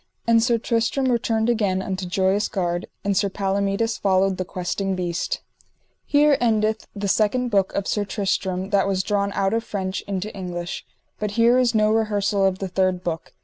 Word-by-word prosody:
And 230 Hz, -1 st, +4 dB
Sir 235 Hz, 0 st, +2 dB
Tristram 230 Hz, +3 st, 0 dB
returned 225 Hz, -2 st, +1 dB
again 205 Hz, -6 st, +1 dB
unto 190 Hz, -1 st, -3 dB
Joyous 190 Hz, +2 st, +1 dB
Gard, 175 Hz, -2 st, -2 dB, 0.2 s
and 200 Hz, -1 st, 0 dB
Sir 200 Hz, +1 st, +2 dB
Palomides 200 Hz, +3 st, -1 dB
followed 190 Hz, -1 st, +2 dB
the 185 Hz, -, -2 dB
Questing 190 Hz, +1 st, -2 dB
Beast. 175 Hz, -2 st, -2 dB, 0.7 s
_Here 290 Hz, -1 st, +5 dB
endeth 220 Hz, -2 st, +1 dB
the 200 Hz, 0 st, -3 dB
second 225 Hz, +5 st, +1 dB
book 195 Hz, -2 st, +2 dB
of 200 Hz, -, -1 dB
Sir 210 Hz, -, 0 dB
Tristram 190 Hz, -1 st, -2 dB
that 200 Hz, -1 st, +3 dB
was 190 Hz, -1 st, 0 dB
drawn 200 Hz, 0 st, 0 dB
out 195 Hz, +1 st, 0 dB
of 225 Hz, 0 st, 0 dB
French 190 Hz, -3 st, -3 dB
into 200 Hz, +1 st, -4 dB
English. 175 Hz, -2 st, -5 dB, 0.3 s
But 210 Hz, -, -1 dB
here 235 Hz, +2 st, +5 dB
is 240 Hz, -2 st, +2 dB
no 215 Hz, 0 st, +4 dB
rehersal 205 Hz, -2 st, +2 dB
of 190 Hz, -1 st, -1 dB
the 195 Hz, -, -4 dB
third 185 Hz, 0 st, 0 dB
book. 165 Hz, -2 st, -4 dB
200 Hz, 180 wpm, -23 LUFS, 190-220 Hz, 0.7 s, Here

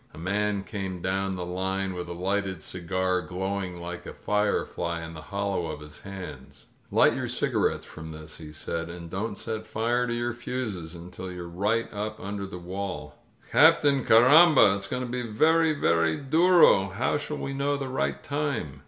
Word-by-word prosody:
A -, -, -12 dB
man 100 Hz, +4 st, -1 dB
came 95 Hz, -3 st, -5 dB
down 95 Hz, +1 st, -1 dB
the 90 Hz, -1 st, -4 dB
line 95 Hz, +1 st, -2 dB
with 90 Hz, -1 st, -5 dB
a -, -, -4 dB
lighted 95 Hz, -1 st, -2 dB
cigar 90 Hz, +1 st, -1 dB
glowing 95 Hz, +1 st, -3 dB
like 85 Hz, 0 st, -6 dB
a -, -, -8 dB
firefly 90 Hz, -5 st, -1 dB
in 80 Hz, -, -9 dB
the 80 Hz, -, -8 dB
hollow 100 Hz, -2 st, -2 dB
of 80 Hz, -2 st, -5 dB
his 75 Hz, 0 st, -11 dB
hands. 95 Hz, -2 st, -9 dB, 0.2 s
"Light -, -, +5 dB
your -, -, -2 dB
cigarettes -, -, 0 dB
from 80 Hz, 0 st, -9 dB
this," 80 Hz, 0 st, -9 dB
he 75 Hz, -2 st, -9 dB
said, 80 Hz, +2 st, -4 dB
and 85 Hz, -1 st, -8 dB
don't 105 Hz, +2 st, -3 dB
set 110 Hz, +2 st, -4 dB
fire 120 Hz, +2 st, 0 dB
to 120 Hz, -, -1 dB
your 120 Hz, 0 st, -1 dB
fuses 110 Hz, -9 st, -4 dB
unti) 90 Hz, +2 st, -8 dB
you're 90 Hz, -1 st, -6 dB
right 105 Hz, +7 st, 0 dB
up 105 Hz, +1 st, -4 dB
under 100 Hz, 0 st, -4 dB
the 95 Hz, -, -7 dB
wall." 95 Hz, +2 st, -6 dB, 0.3 s
"Captain, 145 Hz, -4 st, +5 dB
carrambal 130 Hz, -, +7 dB
It's 100 Hz, -1 st, -5 dB
going 125 Hz, -, -2 dB
to -, -, -4 dB
be 125 Hz, +1 st, -3 dB
very, 155 Hz, +8 st, +3 dB
very 85 Hz, -, +2 dB
durol 155 Hz, -, +5 dB
How 120 Hz, +7 st, +1 dB
shall 150 Hz, +1 st, -4 dB
we 135 Hz, -, -4 dB
know 140 Hz, +1 st, 0 dB
the 135 Hz, -1 st, -4 dB
right 130 Hz, +1 st, -2 dB
time?" 140 Hz, -, -2 dB
95 Hz, 180 wpm, -27 LUFS, 90-120 Hz, 0.3 s, carrambal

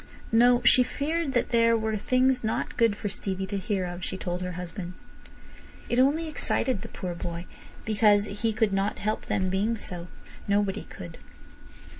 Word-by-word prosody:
No! 245 Hz, +2 st, +5 dB
She 255 Hz, -, +8 dB
feared 295 Hz, +3 st, -1 dB
that 240 Hz, -, +1 dB
there 230 Hz, -1 st, +4 dB
were 220 Hz, 0 st, -1 dB
things 255 Hz, +3 st, +2 dB
not 220 Hz, -, -2 dB
good 230 Hz, -3 st, +3 dB
for 210 Hz, -, -4 dB
Stevie 190 Hz, -1 st, -3 dB
to 200 Hz, +1 st, -3 dB
hear 190 Hz, -1 st, -1 dB
of, 175 Hz, 0 st, -6 dB
she -, -, -3 dB
told 180 Hz, -1 st, -3 dB
her 180 Hz, 0 st, -3 dB
husband. 180 Hz, 0 st, -6 dB, 1.0 s
It 240 Hz, -, +2 dB
only 295 Hz, +5 st, +3 dB
excited 260 Hz, -7 st, 0 dB
the -, -, -7 dB
poor 180 Hz, -2 st, -5 dB
boy, 170 Hz, 0 st, -5 dB, 0.4 s
because 210 Hz, -1 st, +4 dB, 0.2 s
he 225 Hz, -1 st, +2 dB
could 215 Hz, -2 st, +1 dB
not 195 Hz, +2 st, 0 dB
help 215 Hz, +1 st, -2 dB
them 185 Hz, -1 st, 0 dB
being 210 Hz, +4 st, 0 dB
so. 175 Hz, -4 st, -4 dB, 0.4 s
Nobody 200 Hz, -1 st, 0 dB
could. 85 Hz, -2 st, -10 dB
205 Hz, 170 wpm, -27 LUFS, 185-235 Hz, 1.0 s, She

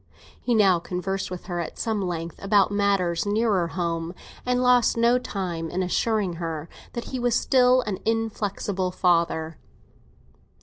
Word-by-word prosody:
But 245 Hz, -, +3 dB
he 190 Hz, -5 st, +5 dB
conversed 190 Hz, +2 st, -3 dB
with 180 Hz, -1 st, -7 dB
her 175 Hz, -2 st, -3 dB
at 170 Hz, -, -5 dB
some 220 Hz, -3 st, -1 dB
length 170 Hz, -3 st, -4 dB
about 200 Hz, 0 st, +3 dB
matters 200 Hz, -3 st, +1 dB
nearer 205 Hz, -4 st, +2 dB
home, 170 Hz, 0 st, -3 dB, 0.3 s
and 250 Hz, 0 st, +2 dB
lost 250 Hz, -2 st, +4 dB
no 235 Hz, +2 st, +4 dB
time 180 Hz, -8 st, -4 dB
in 185 Hz, +3 st, -1 dB
assuring 195 Hz, -1 st, 0 dB
her 165 Hz, -2 st, -4 dB, 0.3 s
that 235 Hz, -, -5 dB
he 260 Hz, -, -1 dB
was 240 Hz, -1 st, +1 dB
still 255 Hz, -1 st, +4 dB
an 205 Hz, -5 st, -4 dB
inflexible 205 Hz, -4 st, -1 dB
father. 170 Hz, -3 st, +1 dB
195 Hz, 145 wpm, -25 LUFS, 175-225 Hz, 0.3 s, he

